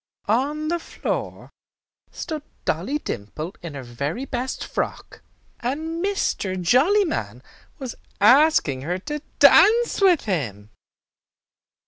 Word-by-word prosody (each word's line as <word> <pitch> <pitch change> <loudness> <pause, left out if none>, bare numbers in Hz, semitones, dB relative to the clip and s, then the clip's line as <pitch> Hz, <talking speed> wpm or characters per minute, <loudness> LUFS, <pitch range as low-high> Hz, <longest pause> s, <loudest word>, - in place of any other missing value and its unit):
On 290 +8 0
the 345 0 0
floor - - -5 0.6
stood 315 -3 -5 0.2
Dolly 190 - 0
Dimple 155 - -6
in 165 -4 -7
her 135 - -6
very 140 - -4
best 255 0 -3
frock, - - -4 0.4
and 320 +7 -3
Mr. 210 - -1
Jollyman 315 - +2 0.3
was 260 -6 -6 0.3
asking 230 - +5
her 175 +6 -2
to 295 +10 -5 0.2
dance 465 0 +6
with 365 -5 +5
him. 110 - -3
255 Hz, 105 wpm, -23 LUFS, -, 0.6 s, dance